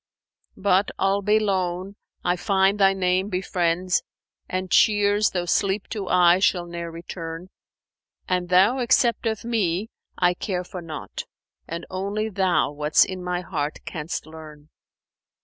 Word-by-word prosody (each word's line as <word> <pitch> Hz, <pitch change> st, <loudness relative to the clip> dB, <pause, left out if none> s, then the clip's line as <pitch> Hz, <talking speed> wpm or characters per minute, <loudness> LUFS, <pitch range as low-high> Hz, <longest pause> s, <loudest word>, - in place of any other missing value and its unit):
But, 195 Hz, 0 st, +2 dB
albe 200 Hz, +2 st, +2 dB
lone, 190 Hz, -1 st, -1 dB, 0.3 s
I 175 Hz, 0 st, +2 dB
find 195 Hz, +2 st, +2 dB
Thy 195 Hz, -1 st, +6 dB
name 185 Hz, +1 st, 0 dB
befriends 180 Hz, -1 st, 0 dB, 0.2 s
* -, -, -50 dB
And 185 Hz, -1 st, -3 dB
cheers, 205 Hz, 0 st, +4 dB
though 175 Hz, -2 st, -2 dB
sleep 195 Hz, +3 st, 0 dB
to 205 Hz, -4 st, -4 dB
eyes 180 Hz, +1 st, +5 dB
shall 180 Hz, -4 st, +2 dB
ne'er 170 Hz, 0 st, -6 dB
return: 165 Hz, +1 st, -7 dB, 0.8 s
An 180 Hz, -1 st, 0 dB
thou 195 Hz, +8 st, +4 dB
accept 235 Hz, -1 st, +2 dB
of 220 Hz, 0 st, -3 dB
me, 210 Hz, -3 st, -1 dB, 0.3 s
I 180 Hz, -1 st, +3 dB
care 180 Hz, 0 st, -3 dB
for 180 Hz, 0 st, -8 dB
naught; 160 Hz, -3 st, -7 dB, 0.2 s
* -, -, -51 dB
And 170 Hz, +1 st, -5 dB
only 200 Hz, +4 st, -2 dB
Thou 190 Hz, -6 st, +1 dB
what's 150 Hz, +1 st, +3 dB
in 185 Hz, -1 st, -6 dB
my 180 Hz, 0 st, -2 dB
heart 155 Hz, -5 st, -3 dB
canst 160 Hz, +1 st, -5 dB
learn!" 155 Hz, -2 st, -12 dB
185 Hz, 145 wpm, -24 LUFS, 175-200 Hz, 0.8 s, Thy